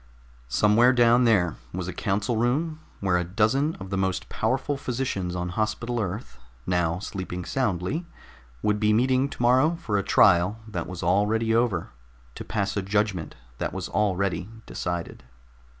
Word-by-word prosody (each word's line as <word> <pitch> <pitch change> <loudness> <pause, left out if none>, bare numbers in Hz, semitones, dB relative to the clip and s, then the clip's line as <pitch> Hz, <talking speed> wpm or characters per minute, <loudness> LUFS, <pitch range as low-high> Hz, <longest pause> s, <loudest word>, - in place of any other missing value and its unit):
Somewhere 110 - +4
down 120 0 +5
there 95 -8 +3
was 90 0 -4
a 95 - -4
council 105 +3 -1
room 145 +8 0 0.2
where 95 -2 +2
a - - 0
dozen 110 - +1
of 95 0 -9
the 100 - 0
most 95 -1 -1
powerful 135 +5 -1
physicians 120 -9 -3
on 90 0 -2
Hospital 110 +5 -2
Earth, 100 - -4 0.3
now 85 -2 +1
sleeping 90 -2 -5
soundly, 125 - -1 0.6
would 105 0 +1
be 105 0 +3
meeting 130 +4 +2
tomorrow 130 +7 +3
for 115 - -1
a - - -2
trial 95 +3 +4
that 110 - -4
was 90 -1 -6
already 105 +5 +2
over, 115 -7 +1 0.4
to - - -7
pass 100 -2 -2
a 100 - 0
judgment 100 -3 -1 0.2
that - - -2
was - - -4
already 95 -3 0 0.2
decided. 85 -1 -4
105 Hz, 150 wpm, -26 LUFS, 90-120 Hz, 0.6 s, down